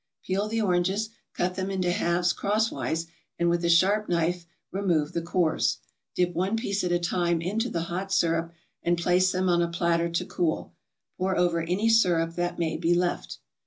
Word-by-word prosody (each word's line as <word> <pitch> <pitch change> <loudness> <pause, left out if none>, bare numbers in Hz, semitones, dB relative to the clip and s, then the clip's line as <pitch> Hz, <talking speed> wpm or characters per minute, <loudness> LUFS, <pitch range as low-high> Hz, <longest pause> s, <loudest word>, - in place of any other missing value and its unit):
Peel 195 +3 0
the 225 +1 -1
oranges, 190 +3 +1 0.3
cut 180 +1 0
them 185 +1 -3
into 185 -2 0
halves 175 0 +1
crosswise, 205 -6 -1 0.3
and 170 0 +2
with 170 0 0
a 170 - +2
sharp 195 +5 +3
knife 170 0 0 0.2
remove 175 -6 0
the 170 - -1
cores. 170 -1 +1 0.4
Dip 180 -1 +1
one 185 +6 0
piece 205 -3 -1
at 180 - 0
a 175 - +3
time 175 -1 0
into 210 +8 -1
the 170 - -2
hot 185 +3 -4
syrup 165 -3 +1 0.3
and 175 0 +1
place 180 +2 +3
them 185 0 0
on 175 -1 +3
a 170 - +2
platter 170 0 0
to 170 - -1
cool. 165 -3 -2 0.5
Pour 190 +1 0
over 175 -1 +2
any 180 +7 0
syrup 175 -7 +3
that 175 0 -2
may 165 -2 -1
be 170 +1 +2
left. 175 0 -1
175 Hz, 185 wpm, -27 LUFS, 170-190 Hz, 0.5 s, sharp